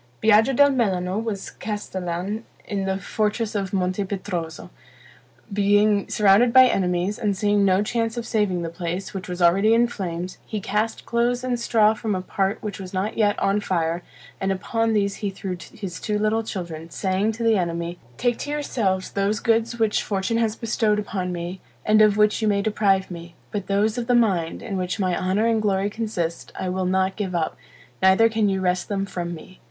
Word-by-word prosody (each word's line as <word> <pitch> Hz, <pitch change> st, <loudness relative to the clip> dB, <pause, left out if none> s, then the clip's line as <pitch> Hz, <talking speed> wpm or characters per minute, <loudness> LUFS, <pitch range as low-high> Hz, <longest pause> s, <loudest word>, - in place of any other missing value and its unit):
Biaggio 220 Hz, +4 st, +4 dB
del 285 Hz, +2 st, +6 dB
Melano 195 Hz, -5 st, 0 dB
was 205 Hz, -4 st, -4 dB
castellan 195 Hz, 0 st, -4 dB, 0.2 s
in 200 Hz, -3 st, -2 dB
the 190 Hz, 0 st, 0 dB
fortress 215 Hz, +2 st, -1 dB
of 195 Hz, -3 st, -2 dB
Monte 185 Hz, +1 st, 0 dB
Petroso. 180 Hz, -4 st, -5 dB, 0.8 s
Being 205 Hz, 0 st, +3 dB
surrounded 210 Hz, +4 st, +4 dB
by 260 Hz, +1 st, +8 dB
enemies, 185 Hz, -2 st, 0 dB
and 205 Hz, -4 st, 0 dB
seeing 205 Hz, 0 st, +2 dB
no 190 Hz, +1 st, +3 dB
chance 225 Hz, +1 st, -1 dB
of 235 Hz, -, -3 dB
saving 200 Hz, -6 st, 0 dB
the 165 Hz, -, -3 dB
place, 175 Hz, +2 st, -4 dB
which 190 Hz, -2 st, -6 dB
was 180 Hz, 0 st, -2 dB
already 195 Hz, +6 st, +5 dB
in 235 Hz, +1 st, +4 dB
flames, 180 Hz, -5 st, -5 dB
he 215 Hz, -, -4 dB
cast 210 Hz, +3 st, -2 dB
clothes 240 Hz, +1 st, 0 dB
and 250 Hz, -2 st, -1 dB
straw 220 Hz, -2 st, +3 dB
from 215 Hz, -2 st, -2 dB
a 185 Hz, -, -2 dB
part 195 Hz, +2 st, -1 dB
which 205 Hz, -3 st, -5 dB
was 185 Hz, 0 st, -7 dB
not 195 Hz, +4 st, -1 dB
yet 205 Hz, -2 st, +2 dB
on 195 Hz, +1 st, +1 dB
fire, 170 Hz, -3 st, -1 dB, 0.4 s
and 195 Hz, 0 st, 0 dB
upon 225 Hz, +4 st, 0 dB
these 200 Hz, -2 st, +1 dB
he 205 Hz, -, -2 dB
threw 190 Hz, -1 st, -5 dB, 0.2 s
his 195 Hz, -7 st, -7 dB
two 210 Hz, -1 st, -1 dB
little 215 Hz, +2 st, +1 dB
children, 170 Hz, -7 st, -6 dB
saying 190 Hz, +4 st, 0 dB
to 230 Hz, +2 st, -5 dB
the 225 Hz, -1 st, +4 dB
enemy, 170 Hz, -1 st, -2 dB, 0.2 s
"Take 245 Hz, -1 st, 0 dB
to -, -, -5 dB
yourselves 225 Hz, -10 st, -1 dB
those 200 Hz, +2 st, 0 dB
goods 230 Hz, +1 st, +1 dB
which 220 Hz, -2 st, +2 dB
fortune 200 Hz, +3 st, -1 dB
has 225 Hz, -2 st, +1 dB
bestowed 220 Hz, -2 st, 0 dB
upon 190 Hz, -3 st, -3 dB
me, 175 Hz, +1 st, -5 dB, 0.2 s
and 215 Hz, 0 st, +5 dB
of 210 Hz, -1 st, +5 dB
which 210 Hz, +1 st, +3 dB
you 220 Hz, -, +1 dB
may 200 Hz, -1 st, +2 dB
deprive 200 Hz, -3 st, +1 dB
me; 170 Hz, 0 st, -9 dB, 0.2 s
but 205 Hz, -2 st, -4 dB
those 210 Hz, +4 st, +1 dB
of 235 Hz, -, -4 dB
the 245 Hz, -, +3 dB
mind, 190 Hz, -9 st, +1 dB
in 205 Hz, -5 st, -3 dB
which 180 Hz, +3 st, -2 dB
my 185 Hz, -3 st, +1 dB
honor 190 Hz, +4 st, +1 dB
and 225 Hz, -1 st, +2 dB
glory 200 Hz, -1 st, +1 dB
consist, 200 Hz, -7 st, -3 dB
I 185 Hz, -, -2 dB
will 185 Hz, 0 st, -1 dB
not 190 Hz, +1 st, +1 dB
give 190 Hz, -4 st, -3 dB
up, 165 Hz, -2 st, -1 dB, 0.5 s
neither 190 Hz, +4 st, +5 dB
can 220 Hz, -2 st, +1 dB
you 190 Hz, -1 st, -1 dB
wrest 180 Hz, -1 st, 0 dB
them 195 Hz, -1 st, -1 dB
from 175 Hz, -3 st, -4 dB
me." 185 Hz, +3 st, -13 dB
200 Hz, 195 wpm, -23 LUFS, 185-220 Hz, 0.8 s, by